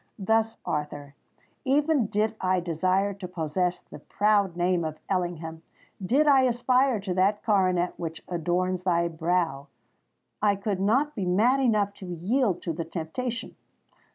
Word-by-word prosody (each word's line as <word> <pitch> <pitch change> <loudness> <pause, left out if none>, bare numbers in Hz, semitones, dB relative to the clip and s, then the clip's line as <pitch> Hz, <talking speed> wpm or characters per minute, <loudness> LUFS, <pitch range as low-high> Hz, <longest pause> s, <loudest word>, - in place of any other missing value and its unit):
Thus, 220 +2 +1
Arthur, 145 -1 -4 0.5
even 290 -2 +2
did 215 +2 0
I 185 0 +2
desire 185 +4 0
to 190 -1 -7
possess 175 +1 -2
the - - -12
proud 205 -4 +1
name 175 0 +1
of 155 -1 -4
Ellingham—did 175 - -2
I 275 -2 +6
aspire 250 0 +2
to 190 -2 -3
that 195 +3 +1
coronet 185 -4 +2
which 165 -1 -6
adorns 180 +1 -1
thy 170 -2 +1
brow—I 170 +4 -3
could 195 -1 -2
not 260 +10 +2
be 200 -8 -3
mad 225 +9 +3
enough 210 -6 +2
to 190 - -9
yield 185 +3 0
to 165 - -2
the 165 +1 -3
temptation. 185 +9 -5
185 Hz, 135 wpm, -26 LUFS, 175-220 Hz, 0.5 s, I